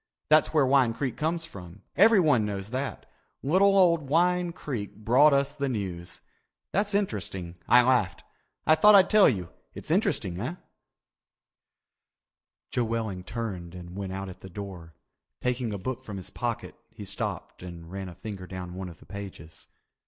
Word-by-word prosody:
That's 155 0 +5
where 150 -4 +4
Wine 130 -3 +3
Creek 130 -3 -2
comes 165 +2 -1
from. 95 - -12
Everyone 165 - +5
knows 100 0 -4
that. 130 -2 -4 0.4
Little 195 +7 +4
old 170 -6 +4
Wine 175 +2 +2
Creek 125 - -5
brought 125 +8 +5
us 140 0 +2
the 140 -1 -2
news. 95 -7 -4 0.5
That's 200 +2 +1
interesting. 95 - -2
I 125 0 +7
laughed. 120 -8 +1 0.4
I 155 - +6
thought 210 +7 +7
I'd 195 -1 +6
tell 215 -2 +7
you—it's 95 -9 -6
interesting, 90 -1 +1
eh?" 130 - -3 2.2
Joe 120 - +1
Welling 110 -5 -3
turned 95 -5 -5
and 90 0 -9
went 100 -1 -4
out 95 +1 -4
at 95 - -10
the 95 - -10
door. 90 -4 -8 0.4
Taking 125 -2 -1
a 100 - -3
book 130 +6 -5
from 105 -5 -7
his 95 - -8
pocket, - - -3 0.2
he - - -10
stopped - - -4
and 85 -2 -9
ran 95 -1 -5
a 85 - -11
finger 100 -4 -7
down 90 -1 -7
one 95 0 -6
of 85 - -12
the - - -18
pages. 90 -6 -9
110 Hz, 160 wpm, -27 LUFS, 95-150 Hz, 2.2 s, I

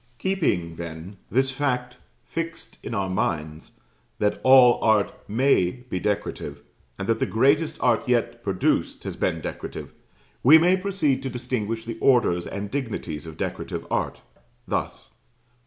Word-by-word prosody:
Keeping, 105 - 0
then, 85 +3 -7
this 130 +4 +2
fact 125 -3 -2 0.3
fixed 165 0 -6
in 115 - -5
our 100 -2 0
minds, 80 -4 -3 0.4
that 105 0 0
all 130 -2 +7
art 110 -2 +3 0.2
may 125 -2 +2
be 90 - -1
decorative, 105 +2 -3 0.3
and 100 - -4
that 115 - +1
the - - +1
greatest 140 - +2
art 120 0 +2
yet 120 -1 +1
produced 95 -4 0
has - - -5
been - - -1
decorative, - - -6 0.5
we 150 +6 +9
may 175 +3 +4
proceed 185 -9 0
to 135 - -3
distinguish 120 -3 -3
the 115 -1 -6
orders 120 -10 +3
and 100 0 -5
dignities 100 - -4
of 80 - -9
decorative - - -4
art, - - -1 0.5
thus: - - -3
I. - - -32
120 Hz, 145 wpm, -24 LUFS, 100-135 Hz, 0.5 s, we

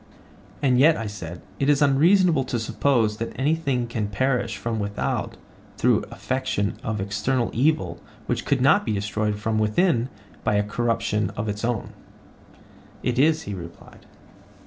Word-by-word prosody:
And 125 -3 +4
yet, 155 +4 +6
I 115 - -4
said, 90 -5 -7 0.2
it 140 - +1
is 145 -1 +4
unreasonable 155 +2 +4
to 125 - -2
suppose 115 -1 +1
that 115 +3 -5
anything 140 -3 +1
can 115 -3 -3
perish 120 0 0
from 115 +2 -3
without 100 0 -2 0.4
through - - +2
affection 130 -6 -2
of 110 -1 -3
external 105 +6 -1
evil 115 - +1 0.3
which - - -1
could - - +1
not - - +5
be 110 - -1
destroyed 105 +1 -1
from 110 +1 -1
within 120 - +2 0.3
by 110 - +1
a 105 - +3
corruption 110 -1 0
of 105 +1 -2
its 105 +1 -3
own? 115 -2 -2 1.1
It 125 0 0
is, 160 +3 +3
he 105 - -5
replied. 85 -3 -11
115 Hz, 150 wpm, -24 LUFS, 105-135 Hz, 1.1 s, yet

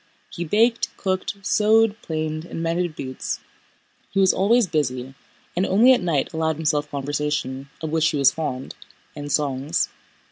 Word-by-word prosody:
He 175 - -4
baked, 225 +7 +2
cooked, 185 +1 -1
sewed, 215 +2 +3
planed, 155 -1 -3
and 165 -1 -5
mended 170 0 -1
boots. 130 -2 -4 0.7
He 195 - -1
was 190 -1 +5
always 225 +5 +3
busy, 130 -6 -2 0.4
and 180 - +1
only 225 +8 +6
at 250 - +1
night 170 -1 0
allowed 160 0 0
himself 150 -1 0
conversation—of 145 0 -3
which 160 0 +3
he 150 - -2
was 135 -1 +5
fond—and 145 0 -7
songs. 140 0 0
160 Hz, 140 wpm, -23 LUFS, 145-190 Hz, 0.7 s, only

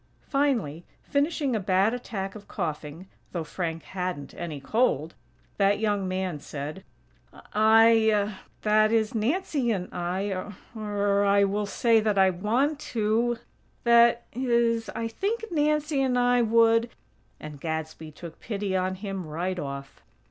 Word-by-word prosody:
Finally, 240 - 0 0.2
finishing 285 -2 0
a - - +1
bad 190 +3 +2
attack 200 -6 -4
of 210 -1 -12
coughing, 160 -2 -5 0.3
(though 170 -3 -2
Frank 165 0 -4
hadn't 180 -7 -5
any 160 -4 -6
cold!), 165 - 0 0.4
that 200 0 +3
young 205 -3 0
man 185 -4 -2
said: 150 +6 -7 0.7
"I, 220 -1 +5 0.3
that 215 0 +4
is, 220 -1 +1
Nancy 265 - 0
and 190 -5 -2
I, 185 +3 -2 0.4
or, 205 -2 0
I 200 0 +4
will 205 +1 0
say 230 +2 +3
that 215 -2 0
I 190 -1 +5
want 240 - 0 0.2
to, 225 +3 +1 0.5
that 235 0 +5
is, 235 -2 +1
I 230 - -2
think 410 - -2
Nancy 300 -2 +1
and 255 -2 +1
I 245 0 +3
would 230 0 +4 0.3
" - - -38
and 150 -2 -9
Gadsby 160 -1 -4
took 165 +2 -11
pity 200 -3 -3
on 185 0 0
him, 195 -3 -5
right 175 +4 -3
off. 140 -2 -7
210 Hz, 140 wpm, -26 LUFS, 180-235 Hz, 0.7 s, I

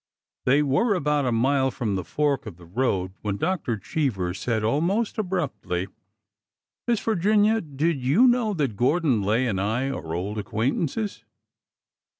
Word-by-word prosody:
They 140 +4 +4
were 200 - +2
about 150 -4 +1
a - - +1
mile 130 +3 +2
from 115 -5 -2
the 95 -2 -2
fork 140 - -1
of 90 -6 -8
the 90 - -14
road 95 -2 -1
when 100 -2 -2
Dr. 155 - -1
Cheever 100 - -1
said 110 +3 -2
almost 175 - 0
abruptly: 130 - -2 0.5
'' 105 - -67
Miss 235 -3 +2
Virginia, 215 +2 +2
did 150 -1 -1
you 170 - +5
know 240 -4 +2
that 140 - -1
Gordon 130 - +2
Lay 110 +6 +1
and 100 -6 -1
I 120 +7 0
are 80 -11 -5
old 100 +5 -3
acquaintances 130 - -2
135 Hz, 150 wpm, -25 LUFS, 105-170 Hz, 0.5 s, you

